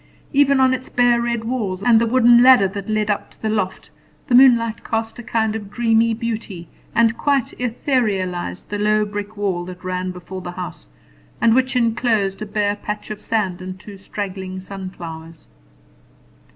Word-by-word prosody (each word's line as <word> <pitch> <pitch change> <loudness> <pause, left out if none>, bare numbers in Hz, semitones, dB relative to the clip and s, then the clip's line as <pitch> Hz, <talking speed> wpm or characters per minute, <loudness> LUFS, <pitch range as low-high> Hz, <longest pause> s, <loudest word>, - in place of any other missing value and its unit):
Even 280 -1 +4
on 260 0 +4
its 260 0 -4
bare 245 -1 +3
red 235 -1 -1
walls, 215 -6 -3
and 230 -1 +5
the 235 - +2
wooden 240 0 +6
ladder 250 -6 +7
that 200 +1 -7
led 215 -1 +1
up 205 - -3
to - - -23
the 220 - 0
loft, 190 -7 -3 0.3
the - - -2
moonlight 235 -3 +5
cast 225 +1 -3
a - - -5
kind 220 -2 -1
of 205 -3 -6
dreamy 225 0 +2
beauty, 220 -7 -5 0.3
and 230 0 +3
quite 280 -4 +1
etherealized 210 - -1
the 205 - -3
low 210 0 +2
brick 205 +1 -6
wall 190 -4 -1
that 180 0 -10
ran 185 0 -3
before 185 +1 -8
the 175 0 -7
house, 175 - -7 0.5
and 230 - +4
which 260 +1 +1
inclosed 225 -5 +1
a 215 - -4
bare 205 0 0
patch 210 +1 -6
of 210 - -6
sand 195 -5 -1
and 185 0 -7
two 205 +1 -11
straggling 190 -1 -6
sunflowers. 175 -4 -9
215 Hz, 175 wpm, -20 LUFS, 190-235 Hz, 0.5 s, ladder